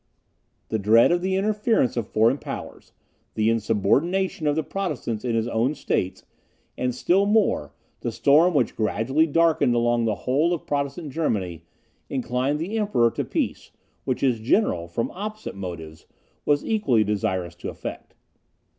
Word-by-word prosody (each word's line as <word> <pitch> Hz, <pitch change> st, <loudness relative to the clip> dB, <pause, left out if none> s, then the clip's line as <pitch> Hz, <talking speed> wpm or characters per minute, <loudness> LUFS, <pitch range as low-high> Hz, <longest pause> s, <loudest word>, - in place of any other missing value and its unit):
The 110 Hz, -, -1 dB
dread 110 Hz, -, +5 dB
of 175 Hz, 0 st, +2 dB
the 190 Hz, +1 st, 0 dB
interference 210 Hz, -, +1 dB
of 115 Hz, -4 st, -3 dB
foreign 115 Hz, +6 st, +3 dB
powers, -, -, -8 dB, 0.4 s
the 110 Hz, +1 st, +2 dB
insubordination 140 Hz, -, +1 dB
of 145 Hz, -, +2 dB
the 160 Hz, -, 0 dB
Protestants 145 Hz, -, -3 dB
in 120 Hz, -2 st, -1 dB
his 115 Hz, 0 st, 0 dB
own 120 Hz, +5 st, 0 dB
states, 95 Hz, -8 st, -2 dB, 0.5 s
and 125 Hz, -1 st, -2 dB
still 190 Hz, +9 st, +2 dB
more 205 Hz, -, +2 dB, 0.3 s
the -, -, -3 dB
storm 160 Hz, +5 st, +4 dB
which 130 Hz, -4 st, +3 dB
was -, -, -30 dB
gradually 130 Hz, +8 st, +1 dB
darkening 165 Hz, -5 st, +3 dB
along 120 Hz, 0 st, +2 dB
the 110 Hz, -2 st, +1 dB
whole 150 Hz, +7 st, +2 dB
of 165 Hz, -, -10 dB
Protestant 145 Hz, +2 st, -3 dB
Germany, 95 Hz, -, -2 dB, 0.4 s
inclined 130 Hz, +2 st, -1 dB
the 195 Hz, +8 st, -2 dB
Emperor 160 Hz, -, +2 dB
to -, -, -2 dB
peace, -, -, -3 dB, 0.3 s
which 130 Hz, -, -2 dB
his 125 Hz, -4 st, +2 dB
general, 110 Hz, -, +1 dB
from 100 Hz, +7 st, -3 dB
opposite 215 Hz, +3 st, -6 dB
motives, 85 Hz, -5 st, -8 dB, 0.4 s
was 145 Hz, -1 st, +2 dB
equally 140 Hz, -, +2 dB
desirous 100 Hz, -4 st, -2 dB
to -, -, -5 dB
effect. -, -, -8 dB
130 Hz, 155 wpm, -24 LUFS, 110-170 Hz, 0.5 s, dread